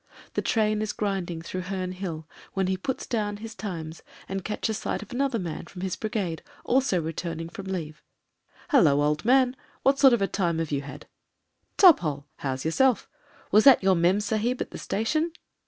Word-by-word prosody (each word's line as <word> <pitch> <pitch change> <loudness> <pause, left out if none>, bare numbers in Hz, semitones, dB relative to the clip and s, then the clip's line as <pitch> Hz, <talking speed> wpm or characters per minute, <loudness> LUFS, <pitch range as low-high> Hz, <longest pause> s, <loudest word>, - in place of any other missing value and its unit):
The - - 0
train 215 -1 +1
is 215 -1 -2
grinding 185 -5 -2
through 185 +2 -4
Heme 185 -1 -4
Hill 170 -4 -5 0.3
when 190 -1 0
he 190 +1 0
puts 245 +8 -4
down 210 -4 -2
his 225 +1 -8
Times 170 -7 -6 0.3
and 195 -1 -4
catches 215 +1 -2
sight - - -3
of 210 - -15
another 265 -1 0
man 170 -4 -5
in 180 - -6
his 190 -1 -2
brigade 205 -7 -3 0.2
also 255 -7 +2
return 165 +1 -4
ing 165 0 -5
from 195 +2 -8
leave. 160 -5 -5 0.7
^'Hullo, 180 - +6
old 150 +1 +1
man! 255 +1 +4 0.3
What 275 +1 +3
sort 270 -3 +7
of 235 - +2
a - - +2
time 175 -5 0
have 165 -2 -2
you 140 -1 0
hadr 140 -2 -9 0.7
^Top 360 -5 +8
hole. 145 -4 -3
How's 130 0 -3
yourself? 250 +9 +2 0.4
Was 215 +2 +6
that 270 -7 +8
your 190 0 +5
mem 180 +4 +3
sahib 220 +4 -1
at - - -4
the - - -7
station?" 310 +10 -1
195 Hz, 190 wpm, -26 LUFS, 165-225 Hz, 0.7 s, ^Top